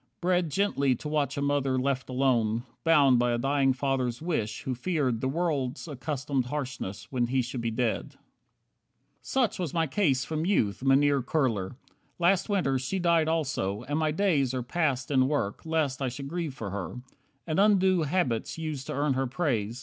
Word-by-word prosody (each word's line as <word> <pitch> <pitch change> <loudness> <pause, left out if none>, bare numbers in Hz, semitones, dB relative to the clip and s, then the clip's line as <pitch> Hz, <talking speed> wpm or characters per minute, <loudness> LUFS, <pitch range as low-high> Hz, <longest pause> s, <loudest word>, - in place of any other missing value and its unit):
"Bred 180 -1 +1
Gently 140 -7 +1
to 150 - -7
watch 145 -2 -1
a 140 - -1
mother 140 -2 +1
left 130 -1 -1
alone; 120 -4 +1 0.2
Bound 145 -6 +5
by 120 0 +2
a - - +1
dying 135 +2 +2
father's 130 -2 -1
wish, 135 -11 -2
who 130 - -2
feared 130 -4 -1
The 130 - 0
world's 145 -2 -1
accustomed 140 -2 -2
harshness 130 -8 -5
when 125 -3 +1
he 130 +1 +1
should 125 0 -5
be 115 - -1
dead; 115 0 -1
18 - - -27 1.0
Such 255 -8 0
was 175 -4 -3
my 165 -1 +2
case 140 -5 +1
from 155 0 -2
youth, 125 - +1
Mynheer 140 +1 +4
Kurler. 120 -8 -1 0.4
Last 180 +4 +2
Winter 155 -10 +1
she 130 +9 -2
died 170 -3 +3
also, 130 -10 -1
and 145 +4 -2
my 155 -1 +1
days 150 -7 +1
Are 125 - -2
passed 135 -2 -1
in 130 -2 +4
work, 140 -2 -2
lest 150 -4 0
I 130 - 0
should 135 +3 -7
grieve 165 -4 -3
for 105 -6 -5
her, 100 +4 -5 0.5
And 160 +1 -1
undo 190 -3 +4
habits 145 -8 -1
used 155 -4 -4
to - - -3
earn 145 0 +1
her 130 0 0
praise. 120 -5 -1
135 Hz, 180 wpm, -28 LUFS, 125-160 Hz, 1.0 s, Bound